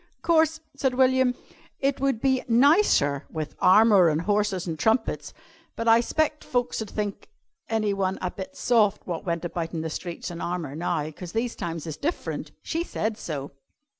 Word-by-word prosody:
"'Course," 320 -1 +3
said 265 -2 0
William, 260 -1 +3 0.4
"it 275 0 0
would 275 -5 +1
be 265 0 +1
nicer 240 - +4
with 155 -2 -5
armour 200 -2 +6
an' 150 - +1
horses 205 0 0
an' 165 - -2
trumpets, 225 +9 0 0.4
but 230 - -3
I 225 0 +7
'spect 305 +4 0
folks 245 -2 -1
ud 215 - -5
think 205 -2 -4 0.4
anyone 200 -4 0
a 180 - -2
bit 200 +9 -8
soft 215 -4 +2
wot 175 0 -5
went 170 0 -1
about 165 0 -4
in 160 - -2
the 160 0 -4
streets 175 +1 -5
in 170 - -7
armour 170 -5 -3
now, 155 -2 -2
'cause 175 +2 -9
these 230 +1 -1
times 165 -2 -5
is 155 -3 -5
different. 330 +4 -3
She 330 +1 -2
said 220 -9 -2
so. 145 -8 -5
210 Hz, 170 wpm, -26 LUFS, 170-255 Hz, 0.4 s, I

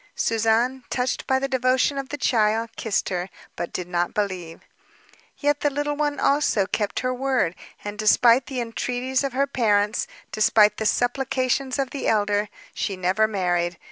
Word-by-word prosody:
Suzanne, 230 +3 +1
touched 250 0 -2
by 265 - +3
the 270 +1 -1
devotion 260 +2 +1
of 270 -1 -6
the 290 - -4
child, 225 -3 +1
kissed 220 -3 -1
her, 180 0 -3 0.3
but 175 - -4
did 180 - -4
not 175 -1 -1
believe. 185 -5 -3 0.8
Yet 290 0 +1
the 290 - +1
little 290 +1 -2
one, 290 -1 -1
also, 275 -8 +2
kept 205 0 -2
her 255 0 -1
word, 255 -9 0 0.3
and 205 0 -6
despite 235 +3 +4
the 260 -3 -3
entreaties 250 +3 -2
of 275 -2 -2
her 275 +2 +2
parents, 210 -5 +1 0.2
despite 215 0 +4
the 220 - 0
supplications 255 +2 0
of 270 -2 -1
the 280 - -3
elder, 205 -1 +1 0.2
she 195 - -3
never 185 +4 +2
married. 175 -4 -1
230 Hz, 165 wpm, -24 LUFS, 205-265 Hz, 0.8 s, despite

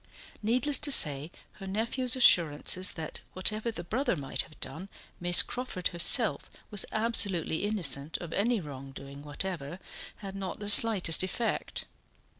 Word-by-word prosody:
Needless 255 +7 +1
to 290 - +3
say, 150 - +5 0.3
her 195 - -9
nephew's 235 +6 -1
assurances 180 - +3
that 160 -2 -8
whatever 215 +5 -1
the 195 -6 -6
brother 235 +6 -2
might 140 -4 -3
have 155 - -14
done 185 +5 -8 0.3
Miss 175 0 +5
Crawford 245 -8 -4
herself 175 -1 +1 0.2
was 205 -2 +1
absolutely 205 -6 -1
innocent 155 -8 -3
of 170 -2 -9
any 230 +3 0
wrongdoing 140 -2 -11
whatever, 150 +1 -7 0.4
had 195 -1 -10
not 195 -2 -6
the 205 0 +1
slightest 205 -7 +6
effect. 205 +5 -4
185 Hz, 135 wpm, -28 LUFS, 160-220 Hz, 0.4 s, slightest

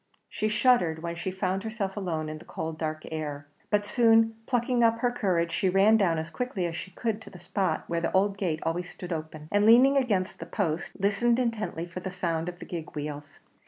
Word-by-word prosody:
She 215 - -1
shuddered 215 -8 +3
when 170 0 -3
she 175 +2 -3
found 190 0 -1
herself 215 -3 -3
alone 165 -6 -2
in 155 0 -6
the - - -14
cold 160 0 -5
dark 155 -1 -3
air; 145 -2 -4 0.2
but 205 -1 +2
soon 225 0 +4
plucking 245 -1 +2
up 230 0 +4
her 245 +1 +1
courage, 180 -8 0
she 190 - +1
ran 195 +4 +5
down 185 -7 +3
as 160 +1 -4
quickly 245 -8 -2
as 165 -1 -3
she 185 - -6
could 220 +3 -3
to - - -11
the 180 - -12
spot 180 -1 -1
where 170 0 -2
the 170 - -1
old 195 +1 +2
gate 175 -6 -2
always 175 +2 -2
stood 180 -1 -6
open, 155 -1 -6
and 205 0 +3
leaning 250 +6 +7
against 205 -8 0
the - - -7
post, 170 -5 -2
listened 220 +4 +2
intently 230 -9 -1
for 175 +1 -7
the 190 - -5
sound 170 -2 -2
of 175 - -9
the - - -9
gig 165 -3 -6
wheels. 145 -1 -6
185 Hz, 220 wpm, -28 LUFS, 165-220 Hz, 0.2 s, leaning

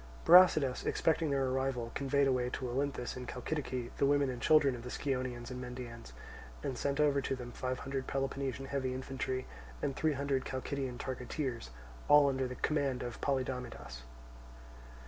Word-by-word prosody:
Brasidas, 165 -7 +7
expecting 160 -1 +1
their 135 -1 +1
arrival, 130 -2 -1
conveyed 140 0 +2
away 125 -2 +1
to 130 - -4
Olynthus 130 0 -2
in 125 -1 -6
Chalcidice 125 -2 -3
the 140 - +3
women 145 -1 +3
and 125 - -7
children 150 -4 +5
of 120 - -6
the 125 - -7
Scionaeans 130 -2 -3
and 125 0 -5
Mendaeans, 125 - -8 0.5
and 130 - -2
sent 140 +3 -1
over 145 -2 +4
to 135 - -1
them 125 -1 -7
five 130 +1 -3
hundred 135 -1 -3
Peloponnesian 135 -1 -2
heavy 130 -2 -2
infantry 130 0 -3 0.3
and 135 - -2
three 155 -1 +1
hundred 140 -1 0
Chalcidian 130 -1 -3
targeteers, 125 - -4 0.4
all 145 -1 +7
under 130 -1 0
the 125 - -6
command 140 -4 0
of 120 -1 -6
Polydamidas. 125 - -3
130 Hz, 160 wpm, -33 LUFS, 125-140 Hz, 0.5 s, Brasidas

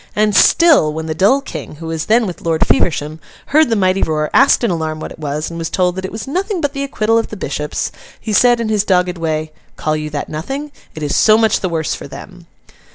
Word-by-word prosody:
And 210 -1 +2
still, 295 - +5
when 160 +1 -5
the 160 - -2
dull 205 - +3
King, 155 - -8
who 165 +2 -10
was 160 -1 -3
then 230 +1 +3
with 180 -4 -6
Lord 165 -1 +1
Feversham, 155 -2 0 0.3
heard 310 -2 +5
the 225 - +2
mighty 190 -1 +1
roar, 155 -1 -1
asked 275 -2 +4
in 230 - +2
alarm 160 -2 -3
what - - -7
it - - -12
was, 150 +1 -3
and 170 - -6
was 165 - -3
told 180 -2 0
that 190 0 -4
it - - -6
was 220 - -6
'nothing 375 +6 -2
but 290 -3 -1
the 275 - -4
acquittal 225 -4 +1
of 225 - -3
the 215 - -8
bishops,' 150 -3 -3 0.3
he 220 - -4
said, 240 +2 +4
in 230 - -2
his 215 -2 +1
dogged 180 -2 +1
way, 155 -1 -2 0.2
'Call 155 0 -1
you 155 0 -4
that 150 -1 -4
nothing? 270 - -5 0.2
It 155 - -6
is 145 - -1
so 215 0 +5
much 220 -2 +2
the 185 - -2
worse 160 -2 -2
for - - -7
them. 180 +4 -12
180 Hz, 245 wpm, -17 LUFS, 155-225 Hz, 0.3 s, still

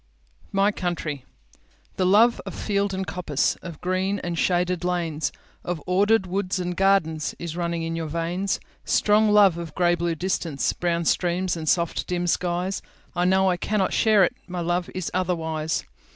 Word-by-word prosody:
My 200 0 +3
Country 165 -8 -3 0.7
THE 185 - +2
LOVE 225 +5 +5
of - - -6
field 200 -1 0
and 190 0 -3
coppice, 160 -4 0
Of 170 -4 -9
green 185 +2 0
and 175 -1 -2
shaded 180 +1 +1
lanes, 170 -4 -1 0.3
Of 175 -2 -3
ordered 200 +3 +3
woods 185 +1 -1
and 180 0 -2
gardensIs 170 -4 +1
running 170 -1 -2
in 165 0 -3
your 165 -1 -3
veins; 170 +5 -1 0.2
Strong 215 +1 +3
love 200 -5 +5
of 165 -3 -7
grey 175 -1 +3
blue 170 -1 -1
distance, 165 -4 -1
Brown 170 -1 -1
streams 180 +2 +1
and 160 -2 -2
soft, 170 -1 +1
dim 175 0 -1
skies—I 175 0 -2
know 190 +1 +4
but 180 -2 +1
cannot 205 -3 0
share 215 -3 +4
it, 215 - +2
My 180 -1 -4
love 175 +1 -1
is 185 -3 -3
otherwise. 160 -4 -1
180 Hz, 160 wpm, -24 LUFS, 170-190 Hz, 0.7 s, LOVE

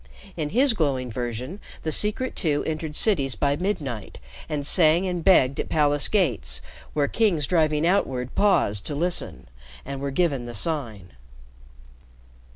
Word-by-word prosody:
In 155 -3 -3
his 255 - +3
glowing 135 - -1
version 125 - -5 0.2
the 155 - -1
Secret 210 - 0
Two 150 -5 0
entered 155 -1 -4
cities 140 - +2
by 140 +5 +1
midnight 145 - -4 0.3
and 150 -2 -3
sang 165 +3 +4
and 180 -2 -2
begged 140 -8 +4
at - - -3
palace 145 -2 +3
gates 65 - 0 0.3
where 145 -2 +1
kings 175 -6 +1
driving 155 -1 +2
outward 130 -9 0
paused 155 - +2
to 145 - -3
listen 175 +4 -2 0.4
and 135 0 -6
were 140 - -2
given 140 -4 0
the 120 - -7
Sign. 110 - -3
150 Hz, 145 wpm, -24 LUFS, 130-175 Hz, 0.4 s, sang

